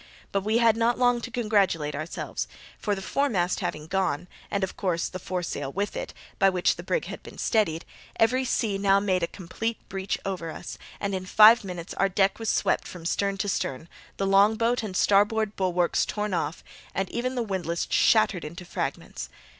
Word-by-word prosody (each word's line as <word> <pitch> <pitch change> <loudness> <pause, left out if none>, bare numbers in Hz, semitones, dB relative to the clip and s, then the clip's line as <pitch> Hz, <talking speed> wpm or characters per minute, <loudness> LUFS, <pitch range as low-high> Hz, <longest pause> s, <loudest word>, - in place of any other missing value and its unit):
But 195 - +1
we 215 +3 +1
had 230 -2 +5
not 230 +1 +2
long 245 -1 +3
to 250 - -5
congratulate 200 -10 +1
ourselves; 155 +3 -4 0.3
for 205 -2 0
the 195 - -7
foremast 190 -9 0
having 155 0 -3
gone, 180 -2 -1 0.2
and, 200 -1 -1
of 190 - -2
course, 175 -4 -1
the 185 - -7
foresail 180 -6 -3
with 200 +5 -2
it, - - -4 0.3
by 195 - +6
which 180 -2 +2
the - - -7
brig - - -1
had - - -7
been - - -12
steadied, 165 -8 +1 0.3
every 250 +4 +3
sea 220 -5 0
now 195 0 +4
made 190 -2 +1
a 170 - +1
complete 220 +6 -4
breach 195 0 -2
over 185 -4 -3
us, - - -7 0.2
and 200 -1 -2
in 185 -1 -3
five 220 +4 +8
minutes 180 -3 -6
our 195 - +1
deck 195 +2 +2
was 225 -1 -2
swept - - +1
from 175 -2 -9
stem 200 +3 0
to 200 - -2
stern, 160 -6 -2 0.3
the 195 - 0
longboat 220 +5 +4
and 195 -4 -4
starboard 210 +1 +3
bulwarks 180 -2 +1
torn 210 -2 -2
off, 170 -1 -2 0.3
and 195 +1 0
even 255 +2 -2
the 245 - 0
windlass 175 -5 -2
shattered 215 -5 +4
into 170 +4 -8
fragments. - - -4
195 Hz, 190 wpm, -26 LUFS, 180-220 Hz, 0.3 s, five